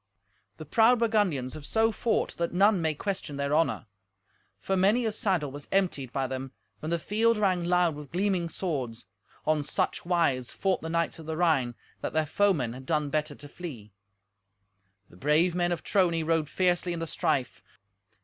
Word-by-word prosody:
The 155 - -8
proud 225 +10 +4
Burgundians 205 - +1
have 155 - -8
so 225 +8 +2
fought 225 +1 -1
that 170 0 -1
none 200 0 +4
my 160 -1 0
question 170 -4 -4
their 140 +1 -1
honour. 160 -6 +1 0.7
For 195 - -1
many 205 +6 +3
a 220 - +1
saddle 185 -9 0
was 145 +1 -8
emptied 175 -10 0
by 135 0 -1
them 130 0 -5 0.3
when 155 - -5
the 170 - +1
field 225 +6 +2
rang 185 -4 +1
loud 175 -1 +2
with 145 -1 -10
gleaming 180 -1 0
swords. 135 -11 -3 0.4
On 155 -1 +2
such 145 - -1
wise 165 -8 +1
fought 190 -1 -1
the 160 - -5
knights 170 0 -1
of 160 - -10
the 160 0 -3
Rhine 145 -9 +2 0.3
that - - -3
their 155 0 +2
foemen 155 - +1
had 130 +1 -10
done 150 -3 0
better 150 -1 -1
to 145 - -10
flee. 130 - -9 1.2
The 90 - -16
brave 155 - +3
men 175 0 0
of 170 - -2
Trony 175 -5 +2
rode 160 -2 +1
fiercely 175 +2 +1
in 170 - -4
the 165 - -2
strife. 155 -6 -1
165 Hz, 180 wpm, -28 LUFS, 145-185 Hz, 1.2 s, proud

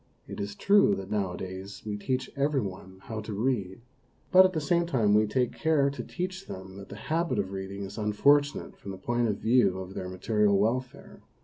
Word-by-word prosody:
It - - -7
is 100 0 -4
true 200 - +4
that 95 +1 -7
nowadays 95 -1 -4
we 105 -1 -3
teach 130 +5 -2
every 140 0 +1
one 95 -3 -6
how 110 -1 -5
to 105 0 -6
read, 105 -3 -1 0.5
but 185 0 +8
at 185 - +1
the 160 - 0
same 170 +3 +1
time 115 -10 +2
we 105 +1 +4
take 125 +3 0
care 150 -3 +2
to 130 -3 -6
teach 185 +5 -5
them 95 0 -8
that 100 - -10
the - - -8
habit 165 +10 -1
of 95 - -1
reading 95 +1 -5
is 100 +3 -7
unfortunate 140 +8 +2
from 100 - -10
the 95 - -6
point 120 +4 0
of 105 -2 -1
view 115 -5 +3
of 95 0 -7
their 95 -2 -5
material 100 +2 +2
welfare. 125 +5 -2
105 Hz, 205 wpm, -28 LUFS, 95-140 Hz, 0.5 s, but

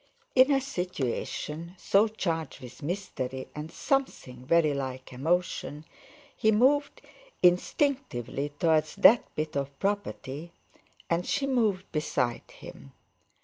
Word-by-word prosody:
In 260 +2 +6
a 275 - +4
situation 175 - -4
so 200 +4 +3
charged 165 -8 -3
with 125 +3 -11
mystery 135 -6 -4
and 150 +2 -6
something 130 - -2
very 160 -2 +4
like 130 -1 -5
emotion 155 +1 -1 0.5
he 220 - +3
moved 270 +7 +2 0.4
instinctively 180 - +1
towards 155 -2 +2
that 215 +4 +7
bit 155 -1 -3
of 140 0 -3
property, 170 -6 -3 0.5
and 170 +1 +1
she 275 - 0
moved 220 -8 0
beside 125 -6 -1
him. 70 -1 -12
170 Hz, 110 wpm, -28 LUFS, 140-205 Hz, 0.5 s, that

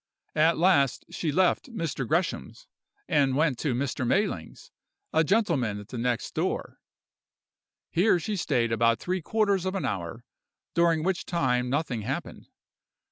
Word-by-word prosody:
At 160 +2 +4
last 155 -7 +3
she 160 - -2
left 185 - +2
Mr. 165 - -3
Gresham's 170 - -2 0.4
and 135 -3 +2
went 145 -4 +1
to 140 -6 0
Mr. 130 +1 -2
Mayling's, 195 - -1 0.4
a 160 - +4
gentleman 155 - +1
at 105 +1 -12
the 125 - -6
next 120 0 -1
door; - - -2 1.1
here 180 +1 +3
she 210 +6 -3
stayed 125 - 0
about 115 +1 +3
three 185 0 -2
quarters 200 +1 +1
of 190 +1 -2
an 195 - -2
hour, 100 +6 -4 0.5
during 165 -2 +3
which 185 0 -1
time 125 -7 +1
nothing 135 -4 -1
happened. - - -5
155 Hz, 140 wpm, -27 LUFS, 125-180 Hz, 1.1 s, At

